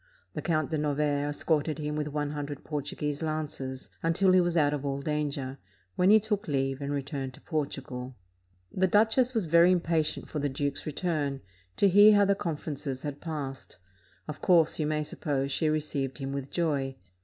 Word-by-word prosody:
The - - -4
Count 155 -3 0
de 155 - 0
Novaire 145 -1 0
escorted 150 0 0
him 150 -1 -3
with 150 -1 -2
one 145 0 -2
hundred 145 -1 -5
Portuguese 145 0 -3
lances, 150 -4 -4
until 180 +3 +3
he 185 0 +6
was 175 -1 0
out 145 -2 +3
of 145 -2 -3
all 140 -1 -2
danger, 140 -2 -2 0.4
when 180 - +3
he 215 +1 +8
took 210 -1 -2
leave 135 -1 -1
and 140 0 -3
returned 135 -2 -4
to - - -17
Portugal. 135 -5 -4 0.6
The 190 0 +2
duchess 225 +6 +3
was 220 -5 +1
very 170 +2 +6
impatient 165 -3 0
for 150 - -4
the 145 0 0
duke's 140 +2 -2
return, 150 -4 -2 0.4
to 200 - +5
hear 205 +3 +7
how 205 0 +5
the 200 - +4
conferences 150 -6 -4
had 145 -1 -5
passed; 140 - -6 0.5
of 150 -1 -7
course, 165 -3 +4
you 150 - +1
may 150 0 0
suppose, 140 -2 -2
she 155 +3 +1
received 145 -3 -1
him 135 -1 -4
with 140 -1 -4
joy. 140 -6 -1
150 Hz, 180 wpm, -29 LUFS, 140-165 Hz, 0.6 s, he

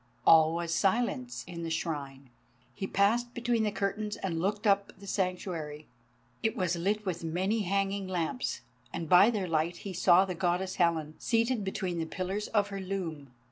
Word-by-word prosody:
All 160 0 +7
was 170 -1 -2
silence 245 - 0
in 175 -1 -7
the 165 - -3
Shrine. 140 -5 -4 0.4
He 195 - -4
passed 235 +6 +1
between 240 -1 +1
the 215 -1 +1
curtains 210 +1 -2
and 165 -4 -3
looked 205 +4 -1
up 200 -1 +3
the 200 - -11
Sanctuary. 180 -6 -3 0.6
It 220 +2 0
was 180 -3 +1
lit 205 +5 -1
with 175 -3 -3
many 185 +7 0
hanging 195 0 0
lamps, 185 - -2 0.3
and 165 - -4
by 180 +6 +7
their 205 -6 -1
light 165 +1 0
he 195 - -4
saw 180 +1 +5
the 185 - -3
Goddess 180 +2 -1
Helen, 165 -3 +1
seated 230 -1 +1
between 190 -3 -2
the 160 - -2
pillars 190 +4 -3
of 205 -2 +1
her 195 -1 -5
loom. 175 -7 -4
190 Hz, 175 wpm, -30 LUFS, 170-205 Hz, 0.6 s, All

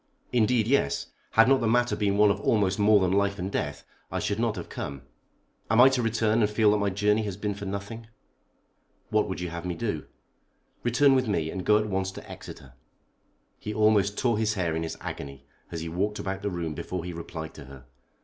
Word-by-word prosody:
"Indeed, 120 -1 +3
yes. 110 - 0 0.2
Had 115 +1 +6
not 135 0 +4
the 115 - +1
matter 120 +2 +2
been 100 -1 0
one 105 0 +6
of - - -3
almost 100 -2 +1
more 105 0 +5
than 95 -2 +1
life 100 +1 +1
and 95 +1 -4
death 75 -6 -3 0.3
I - - -2
should 105 +1 -1
not 115 -2 0
have - - -6
come. 70 -1 -6 0.7
Am 110 +3 +3
I 130 +2 +9
to 130 -2 0
return 115 0 +1
and 105 - +3
feel 105 0 +3
that 105 - +2
my 100 -1 +1
journey 105 +2 +2
has 100 -3 -4
been 105 0 -2
for 100 0 -7
nothing?" 100 +4 -6 1.0
"What - - +2
would - - -4
you 90 -1 -4
have 85 0 -6
me 90 -1 -3
do?" 95 -10 -3 0.7
"Return 135 +4 +4
with 130 -2 +2
me, 80 -6 0
and 95 - -4
go 105 +2 +5
at 110 - 0
once 95 -2 -1
to - - -10
Exeter." 65 -2 -10 0.9
He 105 - -5
almost 105 -2 +3
tore 120 -4 +1
his 110 0 +1
hair 85 -4 -1
in 80 - -1
his 80 - -4
agony 70 0 -7 0.3
as 85 -2 -4
he 85 - -4
walked 100 +5 -1
about 95 0 -4
the 100 - -1
room 85 -4 -3
before 90 +3 -5
he 90 - -5
replied 85 -1 -7
to - - -11
her. 65 -2 -13
100 Hz, 220 wpm, -27 LUFS, 90-110 Hz, 1.0 s, I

